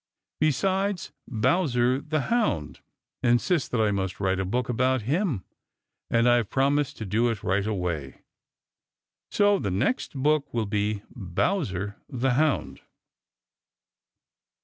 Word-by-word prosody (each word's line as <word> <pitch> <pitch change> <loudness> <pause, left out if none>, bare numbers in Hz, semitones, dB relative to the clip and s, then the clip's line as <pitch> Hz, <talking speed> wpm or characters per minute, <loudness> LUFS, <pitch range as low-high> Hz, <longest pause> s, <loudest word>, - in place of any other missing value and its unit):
Besides, 190 +6 0 0.2
Bowser 125 - +1
the 155 0 -1
Hound 135 - 0 0.4
insists 125 +7 +2
that 125 - -1
I 110 -1 +3
must 95 -1 -2
write 95 -1 +1
a 95 - -1
book 120 +6 -1
about 130 0 +1
him, 145 - 0 0.6
and 115 +1 +3
I 120 0 +6
have 115 -5 -1
promised 140 +1 +1
to 110 - -5
do 115 +5 +1
it 110 -3 -3
right 95 +2 +1
away. 85 - -3 1.1
So 205 -1 +3
the 100 - -2
next 100 - -1
book 145 +2 +1
will 115 -2 +1
be 105 0 -1
Bowser 100 - -1
the 130 -1 0
Hound. 150 +3 0
120 Hz, 125 wpm, -26 LUFS, 100-150 Hz, 1.1 s, I